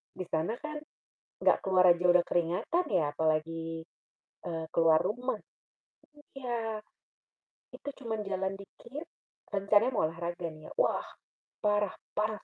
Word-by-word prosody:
Di 185 - -3
sana 165 +8 +1
kan, 305 0 -4 0.6
gak - - +4
keluar 185 -2 +6
aja 175 +1 -5
udah 175 -1 +5
keringatan 175 - +1
ya 150 -6 +2
apalagi, 160 +1 0 0.6
eee, 165 -1 -3
keluar 165 -1 +5
rumah. 235 +4 -1 0.9
Iya, 235 -5 -3 0.9
itu 285 - -7
cuman 220 -2 -2
jalan 190 0 -1
dikit, 270 +10 -9 0.4
rencananya 205 +5 +3
mau - - +3
olahraga 170 +2 -3
nih 155 0 -12
ya - - -15
wah, - - +2 0.6
parah 205 -2 +2 0.2
parahnya 215 0 -1
190 Hz, 125 wpm, -31 LUFS, 165-220 Hz, 0.9 s, keluar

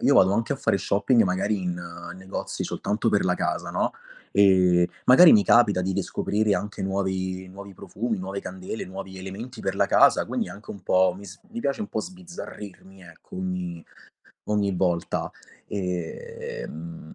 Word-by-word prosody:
io - - +4
vado 95 +1 +6
anche 115 +5 0
a 140 - -2
fare 110 -6 +1
shopping, 100 +5 +3
magari 95 +1 0
in 90 -1 -3 0.4
negozi 95 +1 -5
soltanto - - -1
per - - +2
la - - +3
casa, - - -2
no, - - 0 0.4
e, 90 -3 +5 0.2
magari, 160 +7 +9
mi 105 - +7
capita 105 -4 +5
di 95 +1 -1
riscoprire 105 0 0
anche 105 -1 -4
nuovi 95 -1 -2
nuovi 100 +1 -10
profumi, 110 +3 -4
nuove 95 +1 -4
candele, 95 +4 -6
nuovi 95 +1 -8
elementi 100 +6 -8
per - - -1
la - - +2
casa. - - +5
Quindi, - - -2
anche 105 +2 -10
un 100 -3 -9
po' 90 0 +3
mi 100 - -11
s 95 0 -11
mi 230 +1 -6
piace 140 -5 -1
un 210 - -2
po' - - -2
sbizzarrirmi, 105 - -10
ecco, 85 +1 -13
ogni 90 -2 -4 0.7
ogni 100 -3 +1
volta. 85 -2 0 0.4
Ehm, 85 -4 -5
95 Hz, 165 wpm, -25 LUFS, 90-105 Hz, 0.7 s, magari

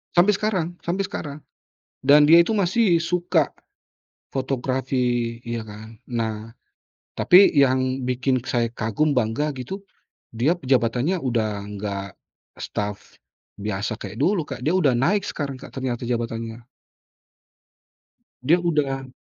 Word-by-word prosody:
Sampe 180 +4 +6
sekarang 185 -5 -1
sampe 180 +3 0
sekarang, 150 -6 -6 0.6
dan 145 +2 +6
dia 165 +3 +8
itu 175 +6 0
masih 190 -1 +3
suka 170 -2 +1 0.8
fotografi 130 -3 -1
iya 115 -1 -3
kan. 110 +1 -11 0.2
Nah, 110 -1 -3 0.7
tapi 185 +3 +7
yang 130 -2 +2
bikin 130 +1 +1
saya 120 -4 0
kagum 115 +7 0
bangga 125 +6 0
gitu 190 +10 -6 0.5
dia 130 +9 +2
jabatannya 130 +5 +1
udah 110 -5 -1
enggak 100 -1 -5 0.5
staf 105 0 -5 0.4
biasa 105 +2 -3
kek 100 +2 -8
dulu, 180 +5 +2
Kak. 130 -3 -7
Dia 160 +4 +2
udah 145 -9 +3
naik 180 +12 +2
sekarang, 140 -3 -4
Kak - - -12
ternyata 130 -3 -3
jabatannya. 115 -1 -3 1.8
Dia 175 +4 +4
udah 140 -6 -1
130 Hz, 120 wpm, -23 LUFS, 115-165 Hz, 1.8 s, dia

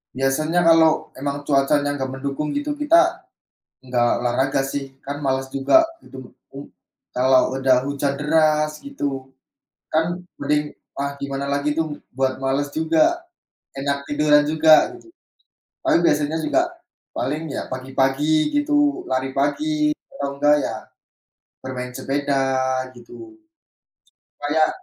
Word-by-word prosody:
Biasanya 155 +6 +1
kalau 165 -1 +4
emang 145 +1 -3
cuacanya 145 0 +2
enggak 135 -2 -3
mendukung 140 +3 -4
gitu, 290 +1 -2
kita 345 +4 +3 0.5
enggak 125 -2 +1
olahraga 130 +3 +1
sih, 135 0 -4
kan 140 +1 -5
malas 135 0 0
juga, 135 - +4 0.2
gitu. 130 -2 -12 0.2
U 140 +1 -9 0.5
kalau 130 +1 +3
ada 130 -1 +3
hujan 140 0 -1
deras, 155 0 +2
gitu, 140 - -5 0.5
kan 165 +3 0 0.2
mending, 150 +1 0 0.2
ah, 140 0 -2
gimana 140 0 -3
lagi 140 +1 0
tuh 155 -2 -3
buat 130 +1 -2
malas 140 +2 -1
juga, 160 0 0 0.8
enak 140 +1 -2
tiduran 150 0 +4
juga, 155 - +5
gitu. 345 -1 -18 0.7
Paling 170 - +2
biasanya 150 0 +2
juga 340 - +2 0.5
paling 155 +4 -2
ya 140 - -4
pagi-pagi 135 - +1
gitu, 290 0 +2
lari 130 +1 -1
pagi 300 - 0 0.2
atau 140 0 -3
enggak 145 +1 +4
ya - - -2 0.9
bermain 125 -1 -5
sepeda, 140 0 -1 0.5
gitu. 130 - -13 1.1
Kayak 150 +2 +2
145 Hz, 120 wpm, -22 LUFS, 135-160 Hz, 1.1 s, juga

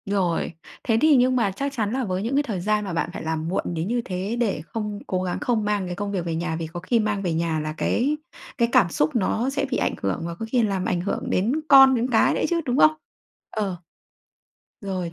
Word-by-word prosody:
Rồi. 190 -5 0 0.3
Thế 225 -2 +2
thì 310 -1 +6
nhưng 255 0 +4
mà 225 -6 +2
chắc 275 +8 -3
chắn 215 -5 -1
là 265 0 0
với 185 -3 -2
những 240 +5 -1
cái 290 - +3
thời 215 -9 -3
gian 210 +2 0
mà 190 - -4
bạn 165 - -1
phải - - -6
làm 160 0 -2
muộn 180 - -1
đến 165 +1 -2
như 240 +2 0
thế 190 +4 -3
để 230 -5 0
không 210 -1 -4
cố 185 -1 -1
gắng 180 -1 -2
không 240 -7 0
mang 205 -2 0
cái 180 - -4
công 205 +2 -3
việc 185 -4 -2
về 165 -1 -2
nhà 165 0 -2
vì 165 0 -4
có 170 +2 -7
khi 230 +7 +1
mang 210 -2 0
về 175 -4 -1
nhà 160 -1 0
là 155 0 -3
cái 285 +5 +1 0.4
cái 235 -3 +2
cảm 235 -10 +5
xúc 155 +2 0
nó 230 +3 +1
sẽ 280 +1 -1
bị 255 - +1
ảnh - - 0
hưởng 95 -1 -1
và 170 0 -4
có 225 - -5
khi 250 - +3
làm 195 -3 -1
ảnh 175 - 0
hưởng 190 - -3
đến 200 +6 +1 0.2
con, 270 -2 +8
đến 240 +1 0
cái 225 - +4
nữa - - -1
chứ, 340 -1 +1
đúng 250 0 0
không? 310 - +7 0.6
Ờ. 200 -4 -2 1.1
Rồi. 185 -4 -4
205 Hz, 255 wpm, -24 LUFS, 175-240 Hz, 1.1 s, con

